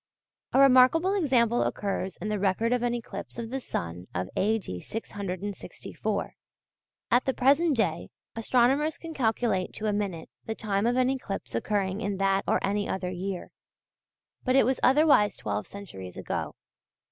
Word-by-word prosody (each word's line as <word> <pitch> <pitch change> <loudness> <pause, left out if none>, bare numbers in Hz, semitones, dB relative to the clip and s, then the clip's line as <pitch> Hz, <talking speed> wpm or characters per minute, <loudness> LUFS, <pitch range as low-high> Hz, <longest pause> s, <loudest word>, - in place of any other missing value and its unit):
A - - +4
remarkable 275 +8 +6
example 250 - +2
occurs 195 -2 -2
in 215 - -4
the 210 -1 -1
record 205 +5 +1
of 250 - +1
an 240 0 0
eclipse 235 -1 -7
of 230 -1 -5
the 270 - -2
sun 90 - -5
of 90 +2 -2
A.D. 205 - 0
664. 200 -3 -5 0.8
At 245 +1 +4
the 265 - 0
present 285 +3 +3
day 225 - 0 0.3
astronomers 255 +7 +2
can 330 -1 -8
calculate 220 - 0
to 215 - -5
a 210 - +1
minute 195 -6 -3
the 220 - -3
time 205 -1 0
of 245 - +2
an 255 0 +3
eclipse 195 - -5
occurring 195 - -1
in 200 -3 -2
that 195 0 +2
or - - +3
any 205 +1 -1
other 180 -1 -2
year. 185 0 -5 0.9
But 255 0 +2
it 270 - +6
was 260 +1 +1
otherwise 270 -8 +4
twelve 105 0 -3
centuries 95 - -9
ago. - - -4
215 Hz, 160 wpm, -28 LUFS, 195-255 Hz, 0.9 s, remarkable